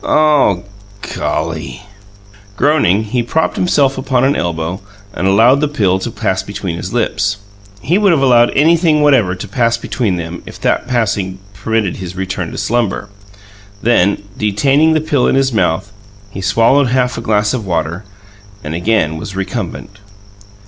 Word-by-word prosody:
"Oh, 150 -12 +3 0.5
GOLLY!" 75 -4 -3 0.7
Groaning, 110 - +2
he 120 +3 -1
propped 155 +7 -1
himself 140 -7 +1
upon 130 -1 0
an 140 +2 +2
elbow 85 +1 -3 0.3
and 95 - -1
allowed 115 +8 +4
the 150 - +2
pill 100 -10 +1
to 95 - -4
pass 105 -5 -1
between 100 -4 -5
his 90 +3 -6
lips. 105 -4 0 0.5
(He 180 +5 +2
would 205 -3 +4
have 150 -5 +2
allowed 120 -2 +5
anything 160 0 +3
whatever 120 -11 +3
to 95 +3 -7
pass 115 +3 +1
between 115 -4 -2
them, 85 0 -6
if - - -10
that - - 0
passing 105 -6 -1 0.2
permitted 110 0 -2
his 90 -1 -7
return 95 -1 -4
to - - -8
slumber.) 115 -4 -1 0.7
Then, 100 -4 +2
detaining 135 +10 +2
the 155 - +1
pill 145 -4 +1
in - - +2
his 135 -1 +1
mouth, 95 -1 0 0.4
he 95 - -7
swallowed 115 +9 +3
half 125 -1 0
a - - -5
glass 105 -1 +1
of 125 -4 -2
water, 85 +2 -2 0.6
and 75 - -5
again 85 -3 0
was 95 +4 -7
recumbent. 95 +1 -5
110 Hz, 155 wpm, -15 LUFS, 95-130 Hz, 0.7 s, allowed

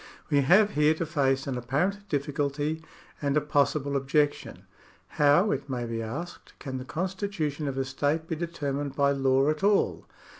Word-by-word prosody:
We 145 -1 +4
have 195 +9 +5
here 150 -1 +3
to 165 - -2
face 135 -4 +1
an 130 -3 -3
apparent 185 +12 -1
difficulty 145 +2 -2 0.4
and 140 0 +1
a - - +6
possible 145 -1 +1
objection. 145 +2 0 0.5
How, 150 +8 +4
it 140 +1 -3
may 125 -2 -2
be 115 -1 -3
asked, 145 +11 -7
can 130 -2 -5
the 130 - -7
constitution 175 -3 -3
of 135 -1 -3
a 135 - 0
state 145 +4 -1
be 165 - -2
determined 145 -4 -3
by 140 0 +3
law 135 0 +2
at 155 +4 -5
all 205 0 +2
145 Hz, 165 wpm, -27 LUFS, 135-160 Hz, 0.5 s, a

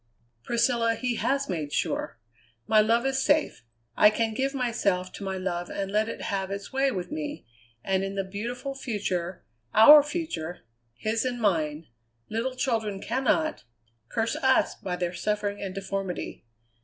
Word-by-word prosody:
"Priscilla, 235 - +2
he 245 0 -2
has 275 +1 0
made 155 -5 -3
sure! - - -1 0.5
My 215 -1 +5
love 230 +3 +2
is 270 0 +1
safe. 295 - +2 0.3
I 210 - +7
can 220 +1 0
give 270 +4 -1
myself 200 -8 0
to - - -8
my 190 -1 -3
love 175 -2 -3
and 195 -1 -3
let 215 +2 +1
it - - -6
have 195 -1 -2
its 200 +5 -6
way 270 +1 +3
with 185 -8 -4
me, 300 -1 -5 0.4
and 190 0 +1
in 195 0 -3
the 195 - 0
beautiful 235 +8 -5
future, 195 -9 -3 0.3
our 290 +8 +10
future, 290 - -4 0.3
his 220 - -1
and 250 -1 -2
mine, 160 -7 0 0.4
little 240 +4 -2
children 225 -6 -1
cannot 265 +8 0 0.5
curse 225 0 0
us 265 0 +3
by 180 -2 -4
their 175 0 -2
suffering 205 +1 -2
and 195 -1 -5
deformity. 195 -6 -4
215 Hz, 155 wpm, -27 LUFS, 190-255 Hz, 0.5 s, our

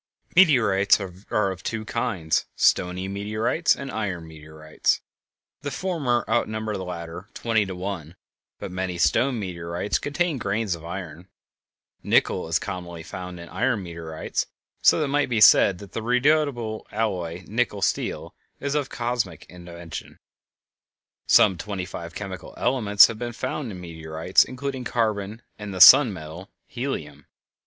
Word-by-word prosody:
Meteorites 110 - +5 0.3
are 100 -2 +1
of 95 - -8
two 110 -1 -4
kinds: 95 -10 -1
stony 90 +1 +2
meteorites 110 - 0
and 135 -1 -7
iron 95 -7 -3
meteorites. 80 0 -2 0.6
The 145 - -3
former 145 -7 -1
outnumber 110 -2 -1
the 95 - -4
latter 90 +2 -7
twenty 110 -3 +1
to 95 - -5
one; 90 -3 -5 0.4
but - - -7
many 90 -1 -3
stone 120 - +2
meteorites 85 0 -3
contain 150 0 -1
grains 100 -1 -1
of 85 -1 -8
iron. 85 -1 -7 0.7
Nickel - - +2
is 80 0 +2
commonly 90 -4 -6
found 90 +1 -7
in 85 - -9
iron 120 -6 0
meteorites, 85 -2 -4 0.3
so - - +6
that 155 - +1
it - - -4
might 145 -1 +1
be 115 -3 +1
said 100 -2 +7
that 100 0 -12
that 115 - -4
redoubtable 125 -2 +1
alloy 90 -5 -2
nickel 105 -2 -1
steel - - -1 0.3
is 140 0 -2
of 145 -3 -1
cosmical 115 -9 -3
invention. 85 -2 -9 1.1
Some 95 -5 +5
twenty 100 -1 -4
five 85 -1 -8
chemical 95 -2 -7
elements 110 -5 +5
have 115 -1 -4
been 120 -1 -4
found 130 +1 -4
in 90 - -8
meteorites, 80 0 +1
including 130 0 -5
carbon 110 -2 -2 0.2
and 105 -1 -6
the 95 - -5
"sun 125 +7 +10
metal," 85 +2 -9 0.2
helium. 75 - -5
100 Hz, 145 wpm, -24 LUFS, 85-120 Hz, 1.1 s, sun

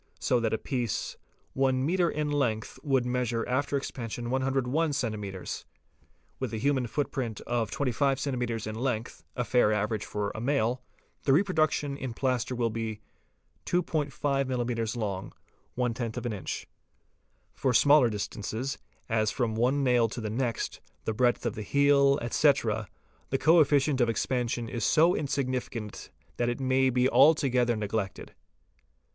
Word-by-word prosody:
so 125 - +1
that 115 -2 0
a 110 - +1
piece 125 -5 -2 0.4
one 130 -1 +1
metre 175 +2 +2
in 150 0 -2
length 115 -7 -1
would 135 -4 +1
measure 125 -2 -1
after 140 +3 0
expansion 120 -3 -5
101 135 +4 +1
centi 115 -6 -1
metres: 95 -2 -6 0.8
with - - -3
a 110 - -3
human 130 +1 +1
footprint 125 -3 -2
of 115 -2 -1
25 135 +2 +1
cms. 125 -5 -2
in 110 - -4
length, 115 -1 -3
a 125 - 0
fair 120 -3 +3
average 105 0 0
for 105 -1 -3
a 110 - -6
male, 125 -1 +1 0.4
the 135 - +1
reproduction 155 -4 +2
in 130 -4 -5
plaster 130 -1 0
will 120 -2 0
be 110 -1 -4 0.7
2°5 160 -4 0 0.4
mms. 120 -3 -2
longer 115 +3 -4
(;;inch). 95 - -5 0.9
For 130 - 0
smaller 140 +1 +6
distances, 110 +5 -4 0.3
as 110 -2 +1
from 120 -3 -1
one 125 +5 +1
nail 120 -3 +3
to 120 - -6
the 110 -2 -3
next, 120 -1 -2 0.2
the 110 - 0
breadth 120 +2 +1
of 120 - 0
the 110 - -6
heel, 140 +4 +4
etc., 120 -4 +2 0.4
the 135 - +1
co 165 +5 +5
efficient 145 -2 +3
of 120 - +3
expansion 120 0 -1
is 115 -1 -4
so 165 - +4
insignificant 130 -6 -3 0.3
that 120 0 +1
it 120 - -3
may 130 0 +3
be 125 0 +3
alto 140 +4 +5
gether 120 -1 +2
neglected. 105 -2 -3
125 Hz, 145 wpm, -28 LUFS, 115-135 Hz, 0.9 s, smaller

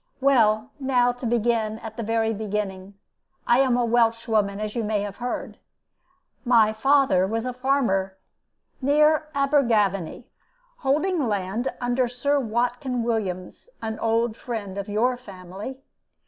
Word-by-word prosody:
Well, 245 -3 +3
now, 250 -3 +2
to 245 0 -5
begin 225 -2 0
at 225 -1 -9
the 235 - -4
very 225 0 0
beginning: 200 -2 -4 0.5
I 240 +1 +4
am 260 -2 +3
a 245 - +2
Welshwoman, 225 -3 +1
as 215 0 -4
you 235 - -1
may 210 -1 0
have 200 -1 -5
heard. 245 0 -5 0.8
My 230 -4 +4
father 260 -5 +3
was 225 +3 -2
a 250 - -3
farmer 240 -8 0 0.6
near 300 +3 +3
Abergavenny, 235 - +1 0.5
holding 310 - 0
land 205 +4 -2
under 245 +1 +1
Sir 280 +4 0
Watkin 245 +1 -1
Williams, 200 - -3
an 220 -1 -5
old 225 0 +1
friend 220 -6 -5
of 200 - -6
your 240 +5 +1
family. 195 +2 -9
230 Hz, 135 wpm, -24 LUFS, 210-255 Hz, 0.8 s, I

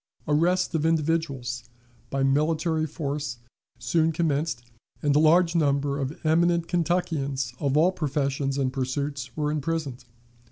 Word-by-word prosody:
Arrests 175 +6 +2
of 160 -2 0
individuals 155 -7 0 0.5
by 135 0 -1
military 155 +3 +1
force 145 -3 -4 0.4
soon 165 -1 +1
commenced, 155 -5 -1 0.4
and 145 -1 +2
a - - +6
large 165 +2 +5
number 140 -3 +1
of 135 +3 -4
eminent 170 +1 +3
Kentuckians 155 -7 -1
of 140 -1 +1
all 170 +4 +5
professions 140 -4 -1
and 130 -2 0
pursuits 135 -1 -3
were 150 -1 0
imprisoned. 150 -4 -3
150 Hz, 125 wpm, -26 LUFS, 140-165 Hz, 0.5 s, a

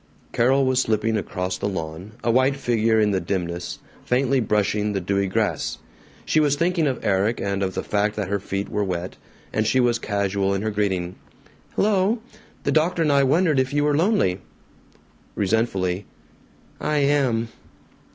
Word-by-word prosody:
Carol 135 +3 +3
was 130 0 +2
slipping 110 -1 0
across 90 -3 -3
the 100 - -1
lawn, 90 +2 -6
a 115 - +2
white 130 +3 +3
figure 115 -4 +1
in 105 -1 +3
the 95 - +1
dimness, 85 -3 -3 0.3
faintly 130 +2 +2
brushing 105 -1 0
the 100 - 0
dewy 100 +2 0
grass. 95 -4 -1 0.5
She 155 - +2
was 145 -2 +3
thinking 170 0 +1
of 130 -3 -3
Erik 100 +4 +1
and 100 0 -2
of 95 -1 -2
the - - -2
fact 105 +1 0
that 105 -3 -2
her 100 +1 -1
feet 95 +1 -3
were 105 - -1
wet, 90 -2 -4 0.4
and 110 +1 +1
she 130 - +2
was 120 -2 +2
casual 100 -2 0
in 100 - -2
her 110 - -1
greeting: 95 -4 -1 0.6
"Hello! 205 +2 +2 0.5
The - - +1
doctor 165 +2 +2
and 150 - +2
I 140 0 +4
wondered 150 +2 +3
if 130 +1 0
you 145 - +3
were 150 -1 +2
lonely." 160 - +2 0.9
Resentfully, 100 -3 0 0.7
"I 150 - 0
am!" 135 -5 +2
110 Hz, 170 wpm, -23 LUFS, 100-135 Hz, 0.9 s, I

